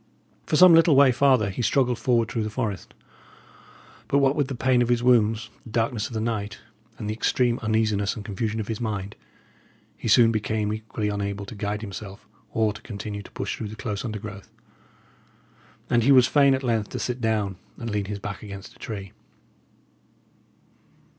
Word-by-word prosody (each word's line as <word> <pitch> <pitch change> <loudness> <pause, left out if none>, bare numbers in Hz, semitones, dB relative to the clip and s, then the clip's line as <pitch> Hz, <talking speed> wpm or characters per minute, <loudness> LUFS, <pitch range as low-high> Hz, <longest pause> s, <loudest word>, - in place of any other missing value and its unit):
For - - +1
some 180 +2 +8
little 165 -2 +6
way 135 -1 +7
farther 125 -5 +3
he 95 - -4
struggled 125 -1 +1
forward 120 -3 +2
through 115 - -2
the 110 - -2
forest; 105 -4 -4 1.1
but 140 - +2
what 140 0 +3
with 145 -3 +1
the 135 - -4
pain 125 0 +2
of 120 - +1
his 120 -1 +2
wounds, 115 -2 +3
the - - -12
darkness 115 -1 -1
of - - -11
the 110 - -2
night, 110 -1 -3 0.4
and 105 - -5
the 105 - -1
extreme 120 +2 +1
uneasiness 110 -3 0
and 105 - -8
confusion 110 +2 -3
of 105 - -4
his 110 0 -4
mind, 105 -3 -3 0.8
he - - -6
soon 115 +1 +6
became 110 -1 -1
equally 110 -1 -3
unable 100 0 -3
to 100 - -9
guide 105 0 -3
himself 100 -1 -8 0.2
or 110 -2 +1
to 105 - -12
continue 105 -1 -6
to - - -13
push - - -3
through 110 - -5
the 105 - -8
close 105 -2 -4
undergrowth, 105 -3 -7 1.4
and 120 - +3
he 130 +5 +4
was 130 -3 +7
fain 140 +1 +4
at 130 - -5
length 115 -4 0
to - - -5
sit 125 0 -3
down 105 -4 0 0.2
and 115 -2 -5
lean 105 -1 -1
his 100 +1 -4
back 105 +1 -6
against 100 -1 -9
a - - -22
tree. 100 -4 -6
110 Hz, 185 wpm, -25 LUFS, 105-120 Hz, 1.4 s, some